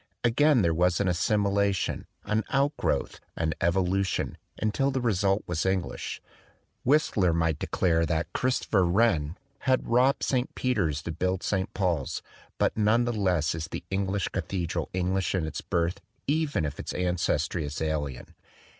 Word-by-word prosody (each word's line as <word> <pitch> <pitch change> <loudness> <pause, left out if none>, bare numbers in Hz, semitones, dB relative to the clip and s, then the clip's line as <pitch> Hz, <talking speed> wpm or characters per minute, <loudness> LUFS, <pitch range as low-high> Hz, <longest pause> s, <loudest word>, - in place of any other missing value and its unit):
Again 125 +1 +4
there 85 -1 +3
was 90 +1 +2
an 100 - +1
assimilation, 100 +1 +1 0.2
an 110 +1 0
outgrowth, 140 +2 0 0.2
an 80 -1 0
evolution, 95 +2 +1 0.2
until 110 +6 +1
the 135 -1 -1
result 100 -4 +1
was 85 -3 -1
English. 95 -2 -2 0.6
Whistler 115 - +3
might 80 -2 +1
declare 85 -2 +1
that 80 +2 -1
Christopher 125 -6 +1
Wren 85 -4 +2 0.2
"had 130 -1 +1
robbed 125 +3 +3
St. 130 -1 0
Peter's 90 - 0
to 85 - -3
build 90 +3 -1
St. 95 -2 -1
Paul's," 85 -8 -1 0.3
but - - +1
none 110 +3 +3
the 120 - 0
less 90 -7 +1
is 80 0 -4
the - - -6
English 95 0 0
cathedral 90 -1 -2
English 95 +1 0
in 90 -4 0
its 80 - -4
birth, 85 +1 -1 0.2
even 145 - +1
if 70 -2 -5
its - - -4
ancestry 90 -2 0
is 75 0 -4
alien. 75 -5 -3
95 Hz, 145 wpm, -27 LUFS, 85-110 Hz, 0.6 s, Again